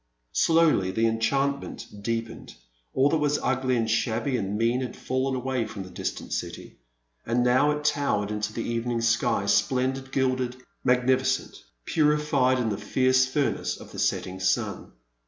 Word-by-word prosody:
Slowly 160 - +3
the 110 +5 +1
enchantment 135 +5 -1 0.2
deepened; 115 +1 -4 0.4
all 135 +2 +3
that 160 - +1
was 145 0 +1
ugly 130 0 0
and 115 -1 0
shabby 115 +3 0
and 100 -3 -2
mean 115 +3 +1
had 125 - -5
fallen 130 +1 -1
away 130 -2 -1
from 100 -3 -7
the 95 - -11
distant - - -5
dty, - - -5 0.5
and 120 +2 +1
now 130 +4 +4
it 150 0 -1
towered 105 -9 +1
into 105 0 -2
the 115 +1 -4
evening 115 0 -1
sky, 115 -3 +1
splendid, 130 +6 +1
gilded, 130 -2 0 0.3
magnifi 130 +1 +3
cent, 130 0 -2 0.2
purified 150 -4 +2
in 120 -3 0
the 100 - -2
fierce 130 +4 +2
furnace 140 +2 -1
of - - -12
the - - -8
setting 95 0 -1
stm. 95 0 -1
125 Hz, 155 wpm, -26 LUFS, 115-135 Hz, 0.5 s, now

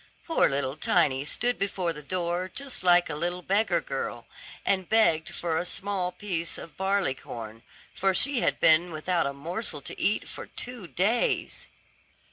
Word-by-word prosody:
Poor 330 - +3
little 135 0 -1
Tiny 135 -2 +2
stood 245 +10 +1
before 185 -3 -1
the 150 - -9
door 175 +3 -2
just 275 -7 -2
like 175 -1 +5
a 160 - -3
little 175 +4 -2
beggar 205 +5 +2
girl, - - -4 0.4
and 190 -2 +1
begged 170 -8 +3
for 165 -2 -2
a - - -1
small 185 0 -2
piece 175 -4 -3
of 165 - -10
barley 190 -6 +1
corn, 115 -3 -9 0.3
for 195 0 +2
she 265 +7 +3
had - - +1
been 170 +2 +5
without 165 0 0
a 140 - -3
morsel 165 +4 -3
to - - -8
eat 210 - +1
for - - -8
two 240 -7 -8
days. 195 - 0
180 Hz, 165 wpm, -27 LUFS, 155-200 Hz, 0.4 s, like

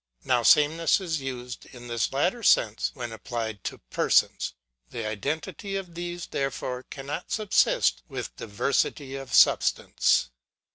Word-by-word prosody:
Now 125 -2 +3
sameness 155 - +4
is 165 -6 -2
used 125 -2 -6
in 120 -1 -12
this 115 -2 -1
latter 175 - 0
sense, 110 - +3
when 120 -3 -5
applied 110 -2 -5
to - - -3
persons. - - +2 0.3
The 115 - -5
identity 150 - -3
of 185 -3 -5
these, 175 0 -5
therefore, 130 -2 -3
cannot 145 +4 -6
subsist 125 - +2
with - - -6
diversity 135 +5 -1
of 135 -1 -7
substance. - - +3
135 Hz, 130 wpm, -27 LUFS, 115-165 Hz, 0.3 s, sameness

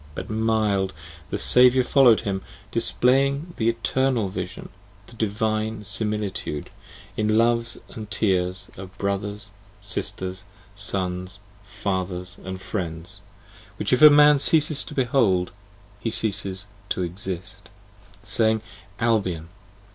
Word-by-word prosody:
but, - - -6
mild, 110 -3 +1 0.4
the - - -2
Saviour 125 +1 +5
follow'd 125 -4 +5
him, 100 -3 -2 0.3
Displaying 140 +7 +2
the 115 0 +2
Eternal 115 -1 0
Vision, 95 -1 -6 0.4
the - - -16
Divine 110 0 -1
Similitude, 105 -7 -3 0.4
In 110 0 +1
loves 115 0 +2
and 110 -2 -9
tears 95 -4 0
of 95 0 -10
brothers, 100 +1 -3 0.3
sisters, 95 -1 -5 0.3
sons, 95 -2 -3 0.3
fathers 95 -3 -3
and 95 0 -6
friends, 85 -4 -5 0.6
Which - - -1
if 125 - +3
Man 150 -1 +8
ceases 155 0 +3
to 150 - -9
behold, 115 -9 +2 0.5
he 115 - -2
ceases 100 -3 -2 0.2
to 90 - -1
exist: 95 +2 -5 0.3
/ 100 -1 -26
Saying, 110 -1 +1 0.4
Albion! 100 -9 0
105 Hz, 110 wpm, -24 LUFS, 95-115 Hz, 0.6 s, Man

